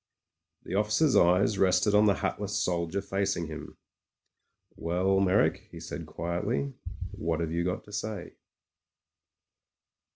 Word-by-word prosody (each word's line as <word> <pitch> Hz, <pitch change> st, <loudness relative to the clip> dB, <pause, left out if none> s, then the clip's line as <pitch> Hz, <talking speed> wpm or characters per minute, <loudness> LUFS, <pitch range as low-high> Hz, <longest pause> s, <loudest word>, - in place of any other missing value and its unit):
The -, -, -7 dB
officer's 105 Hz, +9 st, +2 dB
eyes 95 Hz, +4 st, +4 dB
rested 95 Hz, +2 st, +3 dB
on 105 Hz, +1 st, +6 dB
the 100 Hz, -, +4 dB
hatless 105 Hz, -1 st, -2 dB
soldier 90 Hz, +1 st, -1 dB
fac 100 Hz, 0 st, -1 dB
ing 85 Hz, -, -2 dB
him. 80 Hz, 0 st, -8 dB, 1.0 s
"Well, 90 Hz, +3 st, +1 dB
Meyrick," 95 Hz, +1 st, +2 dB
he -, -, -10 dB
said -, -, -7 dB
quietly, 100 Hz, +11 st, -2 dB, 0.4 s
"what 85 Hz, -6 st, -2 dB
have 80 Hz, -1 st, -2 dB
you 85 Hz, +1 st, 0 dB
got 90 Hz, +1 st, -2 dB
to 105 Hz, -, -15 dB
say 105 Hz, -2 st, -4 dB
95 Hz, 130 wpm, -29 LUFS, 85-105 Hz, 1.0 s, on